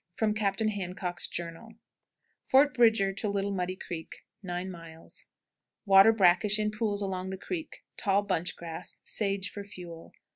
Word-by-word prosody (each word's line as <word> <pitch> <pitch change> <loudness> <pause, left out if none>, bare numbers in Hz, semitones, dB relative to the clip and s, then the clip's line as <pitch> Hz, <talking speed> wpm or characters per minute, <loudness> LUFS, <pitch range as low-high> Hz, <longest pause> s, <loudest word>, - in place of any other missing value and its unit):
"_ - - -32
From 215 -1 +2
Captain 210 0 0
Handcock's 180 -3 -3
Journal. 170 +4 -6
Miles. 225 -1 -16 0.7
Fort 280 +2 +5
Bridger 225 -5 +4
to 200 +2 -3
9. 200 - -2
Little 200 0 0
Muddy 185 -1 -2
Creek. 170 -3 -8 1.6
Water 195 +2 +8
brackish 200 0 +4
in 210 0 0
pools 210 -1 -1
along 190 -1 -3
the 190 - -4
creek; 320 - -6
tall 200 0 +2
bunch 175 -3 -1
grass; 165 -2 -6
sage 200 -2 -1
for 205 - -7
fuel. 175 -4 -10
200 Hz, 150 wpm, -29 LUFS, 185-215 Hz, 1.6 s, Water